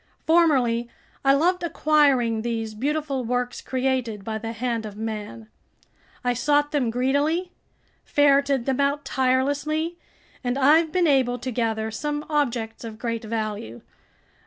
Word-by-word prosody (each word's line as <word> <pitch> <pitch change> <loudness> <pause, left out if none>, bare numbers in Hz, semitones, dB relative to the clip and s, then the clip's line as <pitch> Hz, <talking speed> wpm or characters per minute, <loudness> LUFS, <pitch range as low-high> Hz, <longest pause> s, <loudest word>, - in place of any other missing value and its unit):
Formerly 260 -8 +3 0.3
I 275 0 +5
loved 355 +5 +2
acquiring 285 -9 +2
these 225 -1 -3
beautiful 280 +3 -2
works 245 +1 -2
created 255 -5 -1
by 220 +1 -4
the 225 +1 -5
hand 230 0 -2
of 210 -1 -8
man. 210 - -5 0.8
I 245 0 +1
sought 290 +4 +1
them 275 -6 +1
greedily, 285 +9 0 0.5
ferreted 280 -3 +3
them 265 -1 0
out 280 +1 +1
tirelessly, 285 +6 0 0.4
and 245 +1 -1
I've 310 +4 +4
been 360 +1 +2
able 260 -5 +3
to 255 +1 -5
gather 220 -2 -1
some 295 +4 -3
objects 240 -8 -1
of 225 -2 -7
great 230 -1 -3
value. 215 - -4
255 Hz, 135 wpm, -24 LUFS, 230-290 Hz, 0.8 s, I